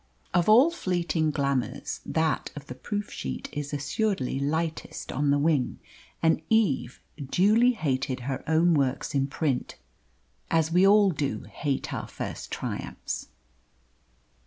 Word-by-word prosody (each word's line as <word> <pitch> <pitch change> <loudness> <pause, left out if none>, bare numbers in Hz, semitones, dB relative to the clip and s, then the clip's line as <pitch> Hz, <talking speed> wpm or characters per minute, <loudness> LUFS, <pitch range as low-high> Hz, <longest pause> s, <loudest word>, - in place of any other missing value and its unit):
Of 175 +2 +3
all 255 +10 +7
fleeting 175 - 0
glamours 140 -5 -1
that 160 0 0
of 145 -1 -8
the 125 - -7
proof 205 +11 -4
sheet 65 -1 -5
is 145 -1 -4
assuredly 145 - -1
lightest 160 +3 -2
on 145 +2 0
the 140 - +4
wing, 145 -3 +1 0.5
and 160 0 +3
Eve 175 - +2 0.2
duly 215 - +4
hated 135 - -1
her 135 +2 -3
own 165 +2 +4
works 135 -3 0
in 135 -1 +1
print, 140 -2 -2 0.7
as 160 0 +2
we 180 +3 +5
all 205 -1 +6
do 145 -3 -2
hate 140 -2 -3
our - - -4
first - - -6
triumphs. - - -4
155 Hz, 135 wpm, -27 LUFS, 140-180 Hz, 0.7 s, all